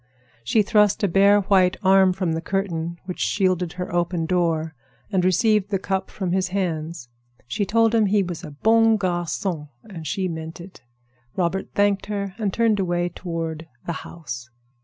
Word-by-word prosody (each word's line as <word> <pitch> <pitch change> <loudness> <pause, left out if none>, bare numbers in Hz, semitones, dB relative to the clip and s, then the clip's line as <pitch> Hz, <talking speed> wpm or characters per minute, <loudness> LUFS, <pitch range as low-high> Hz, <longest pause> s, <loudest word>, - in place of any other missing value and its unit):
She 210 - +3
thrust 210 0 +3
a - - +4
bare, 200 +3 +5
white 185 -2 +3
arm 190 0 +5
from 180 -2 -1
the 160 - -2
curtain 170 -3 -2
which 180 -1 -6
shielded 185 -4 +1
her 180 -1 -5
open 175 -1 0
door, 165 -2 0 0.4
and 190 -3 +1
received 205 +2 +3
the 200 - +1
cup 190 0 -2
from 185 -3 -3
his 185 +1 +1
hands. 170 -7 -3 0.4
She 160 - -2
told 225 +2 +3
him 220 -2 +4
he 200 0 +3
was 175 -1 -6
a 160 - -7
bon 225 +8 +3
garçon, 175 -3 -2
and 170 -8 -8
she 190 -3 -1
meant 160 -1 -6
it. 180 +2 -12 0.5
Robert 185 +1 -1
thanked 200 -1 +2
her 200 -2 -3
and 205 -3 0
turned 225 0 +2
away 175 -1 0
toward 165 -2 -5 0.2
"the 170 - -2
house." 120 -8 -8
185 Hz, 170 wpm, -23 LUFS, 170-200 Hz, 0.5 s, bare